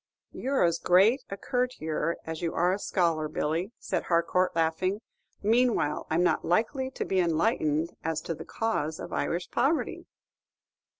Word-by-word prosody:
"You're 270 +1 0
as 170 -1 +2
great 200 +9 +4
a 195 - -5
courtier 180 - -1
as 160 -1 -5
you 170 -1 -2
are 180 +2 +3
a 195 - -2
scholar, 165 -6 +1
Billy," 160 +5 -2
said - - -2
Harcourt, 175 +2 +1
laughing; 165 +5 0 0.4
"meanwhile, 225 -8 +2
I'm 165 +3 +2
not - - +2
likely 245 - +1
to 265 - -4
be 190 - +1
enlightened 165 -2 +1
as 160 -1 -1
to 165 - -3
the - - -8
cause 160 -9 -2
of 175 - -7
Irish 175 +1 -2
poverty." 315 +4 0
175 Hz, 155 wpm, -28 LUFS, 160-220 Hz, 0.4 s, great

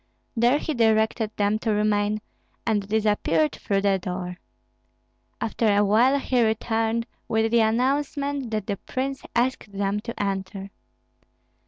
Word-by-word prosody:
There 240 +4 +4
he 310 - -3
directed 220 -2 +2
them 205 +1 +1
to 225 - -2
remain, 210 0 +1 0.4
and 205 -3 0
disappeared 205 -8 +2
through 195 -1 -1
the 195 -1 +2
door. 180 0 -5 1.0
After 220 -1 +1
a 205 - +4
while 240 +7 +4
he 255 -2 +1
returned 225 +1 0 0.2
with 220 0 +1
the 235 - +4
announcement 275 +4 0
that 215 -3 -2
the 200 - -2
prince 270 +5 -4
asked 240 -3 0
them 200 +1 -1
to 235 +2 -7
enter. 195 0 -3
220 Hz, 135 wpm, -25 LUFS, 205-235 Hz, 1.0 s, There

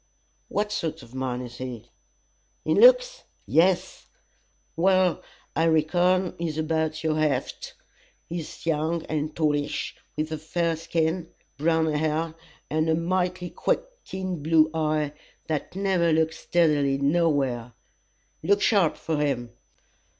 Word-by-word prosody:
"What 210 +1 -1
sort 160 -8 -3
of 120 +1 -16
man 130 -1 -2
is 120 0 -10
he?" 125 -3 -7 0.7
"In - - +2
looks?" - - +6 0.2
"Yes!" 180 +2 +2 0.7
"Well, 185 +1 +3 0.3
I 160 - +2
reckon, 175 +3 +2
he's 160 -3 -2
about 160 0 -1
your 155 -1 +1
heft. 155 -2 -1 0.5
He's 170 -1 -6
young 160 +1 0
and 155 0 -3
tallish, 150 -2 -1 0.2
with 155 +1 -2
a 155 - -3
fair 165 +1 -1
skin, 165 +1 -1 0.3
brown 160 +2 +2
hair, 155 +2 0 0.3
and 155 +1 0
a 160 - +4
mighty 180 +1 -1
quick - - 0 0.2
keen 185 -4 -4
blue 155 +1 +4
eye, 155 -2 0 0.3
that 155 +2 -3
never 190 -4 +2
looks 160 0 +1
steadily 150 -5 +2
nowhere. 140 -6 +1 0.7
Look 200 +5 +3
sharp 195 -8 +3
for 160 -2 -2
him. 135 -5 -1
160 Hz, 125 wpm, -26 LUFS, 150-175 Hz, 0.7 s, looks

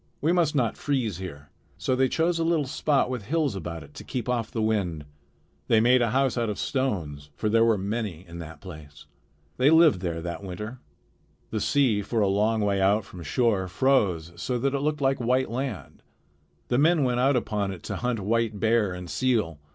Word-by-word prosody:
"We 160 - +1
must 170 -4 +2
not 120 -5 +1
freeze 125 - -1
here." 75 -6 -8 0.3
So 130 - 0
they 130 0 +2
chose 165 +3 +1
a - - +1
little 165 -3 +1
spot 140 +1 +1
with 125 -5 -4
hills 150 -4 0
about 85 -3 -6
it 70 +1 -16
to - - -9
keep 125 -3 -4
off 120 -3 -1
the 115 - -4
wind. 100 -9 -1 0.6
They 110 - +4
made 125 +3 +4
a 120 - +2
house 130 0 +1
out 115 -2 0
of 105 - -3
stones; 85 - -2
for 110 - -1
there 115 +1 +4
were 115 -2 +3
many 100 -3 -4
in 85 +1 -9
that 80 -1 -9
place. 75 -6 -11 0.5
They 135 - +4
lived 160 - +6
there 85 -3 -2
that 85 +2 -5
winter. 105 +6 -6 0.7
The 110 - -2
sea 130 -8 +2
for 115 +3 -2
a 105 - +3
long 105 +3 +1
way 100 -1 +1
out 100 +2 +3
from 90 - -11
shore 95 - +1
froze 90 -8 +1
so 125 +8 -2
that 135 +3 0
it 140 - 0
looked 150 +1 -1
like 135 -1 +2
white 125 +1 +1
land. 125 -4 -5 0.7
The 125 - +2
men 160 0 +4
went 125 -1 +1
out 135 +2 +3
upon 105 -5 -1
it 90 -3 -9
to - - -4
hunt 125 -3 -2
white 110 +1 0
bear 110 -3 +2
and 90 0 -7
seal. 110 - 0
115 Hz, 205 wpm, -26 LUFS, 95-130 Hz, 0.7 s, lived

